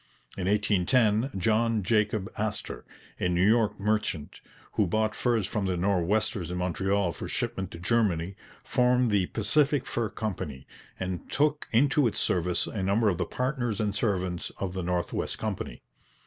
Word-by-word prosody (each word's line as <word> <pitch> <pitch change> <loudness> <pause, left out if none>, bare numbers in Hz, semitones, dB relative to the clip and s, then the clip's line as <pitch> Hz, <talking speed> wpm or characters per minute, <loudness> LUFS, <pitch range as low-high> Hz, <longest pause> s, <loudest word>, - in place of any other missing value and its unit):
In 95 -1 -3
1810 105 +3 +2
John 110 +2 +2
Jacob 105 -1 +1
Astor, - - -3 0.3
a 90 - +1
New 90 +2 +3
York 110 -2 +3
merchant, 105 -7 -1 0.3
who 105 - +1
bought 110 +4 +1
furs 115 -5 +1
from 100 0 -2
the 90 -1 0
Nor'westers 100 +1 +1
in 90 - -3
Montreal 95 +1 0
for - - -6
shipment 95 -2 -2
to - - -9
Germany, 95 -2 +1 0.3
formed 125 -1 +2
the 100 -3 +2
Pacific 135 +5 +2
Fur 115 -2 -1
Company, 95 -11 -4 0.3
and 90 -2 -4
took 150 +1 +1
into 135 +3 +4
its 110 - -2
service 90 -1 +1
a 105 - -4
number 100 +3 +3
of 90 - -1
the - - 0
partners 125 -5 -1
and 105 -2 0
servants 95 -5 -1
of 95 -2 -3
the 95 - -3
North 90 0 -1
West - - -2
Company. 110 -3 -4
105 Hz, 160 wpm, -28 LUFS, 90-115 Hz, 0.3 s, into